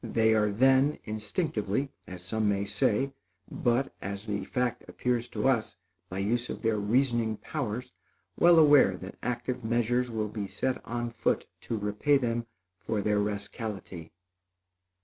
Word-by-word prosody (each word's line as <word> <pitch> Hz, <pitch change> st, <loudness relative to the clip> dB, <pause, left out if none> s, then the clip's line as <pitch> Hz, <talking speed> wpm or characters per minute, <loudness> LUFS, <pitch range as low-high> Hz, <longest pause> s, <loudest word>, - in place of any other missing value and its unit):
They 110 Hz, -1 st, +3 dB
are 105 Hz, -1 st, +3 dB
then, 130 Hz, +6 st, +4 dB
instinctively, 110 Hz, -, -2 dB, 0.2 s
as 90 Hz, -1 st, -8 dB
some 110 Hz, +3 st, 0 dB
may 100 Hz, 0 st, 0 dB
say, 105 Hz, +6 st, +1 dB, 0.4 s
but, 120 Hz, +2 st, +1 dB
as 100 Hz, +2 st, -5 dB
the 105 Hz, -2 st, -2 dB
fact 125 Hz, -1 st, -1 dB
appears 125 Hz, -1 st, -1 dB
to 105 Hz, +3 st, -1 dB
us, 115 Hz, -9 st, +1 dB, 0.3 s
by 95 Hz, -, -5 dB
use 120 Hz, +5 st, 0 dB
of -, -, -6 dB
their 110 Hz, -2 st, +2 dB
reasoning 115 Hz, 0 st, +1 dB
powers, 125 Hz, -3 st, -4 dB, 0.4 s
well 170 Hz, 0 st, +6 dB
aware 145 Hz, -, +6 dB
that 95 Hz, +2 st, -9 dB
active 125 Hz, 0 st, -3 dB
measures 120 Hz, +2 st, +1 dB
will 110 Hz, -2 st, -2 dB
be 105 Hz, -2 st, -4 dB
set 130 Hz, +5 st, -2 dB
on 120 Hz, 0 st, -2 dB
foot 115 Hz, -, 0 dB, 0.2 s
to 115 Hz, -, 0 dB
repay 105 Hz, +8 st, +2 dB
them 120 Hz, -3 st, -1 dB, 0.3 s
for 105 Hz, -2 st, -2 dB
their 105 Hz, 0 st, +2 dB
rascality. 100 Hz, -4 st, -4 dB
115 Hz, 150 wpm, -29 LUFS, 105-125 Hz, 0.4 s, well